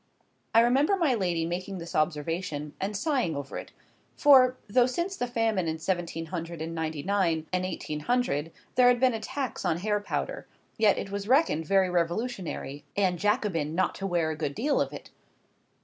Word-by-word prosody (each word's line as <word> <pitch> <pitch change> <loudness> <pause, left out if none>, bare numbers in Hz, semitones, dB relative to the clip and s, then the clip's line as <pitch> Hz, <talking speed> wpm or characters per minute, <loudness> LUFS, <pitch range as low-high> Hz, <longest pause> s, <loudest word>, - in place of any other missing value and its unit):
I 230 - +8
remember 270 +10 +3
my 330 -8 +2
lady 175 -7 0
making 185 +3 -4
this 170 -1 -8
observation, 155 -1 -1
and 200 +1 -2
sighing 250 - 0
over 140 -1 -6
it; - - -10 0.5
for, 260 -3 +6
though 240 +4 +4
since 345 +9 -2
the 245 - -2
famine 225 -7 0
in 160 0 -1
seventeen 170 -1 -2
hundred 170 -1 -5
and 165 +1 -4
ninety 160 -3 -3
nine 175 -5 +1
and 185 0 +1
eighteen 155 -4 -4
hundred 165 - 0 0.2
there 250 -1 +5
had 245 -1 +5
been 255 -1 +4
a 225 - -2
tax 260 +3 -4
on 160 - +1
hair 210 +3 0
powder, 205 - -4 0.3
yet 215 -2 +4
it 195 - -4
was 200 0 -4
reckoned 250 - +3
very 195 0 +4
revolutionary 175 - -2
and 185 -3 +2
Jacobin 200 - 0
not 185 - +1
to 195 - -4
wear 170 -3 +1
a - - -3
good 150 -2 -3
deal 285 +4 +1
of - - -1
it. - - -10
185 Hz, 185 wpm, -28 LUFS, 165-240 Hz, 0.5 s, I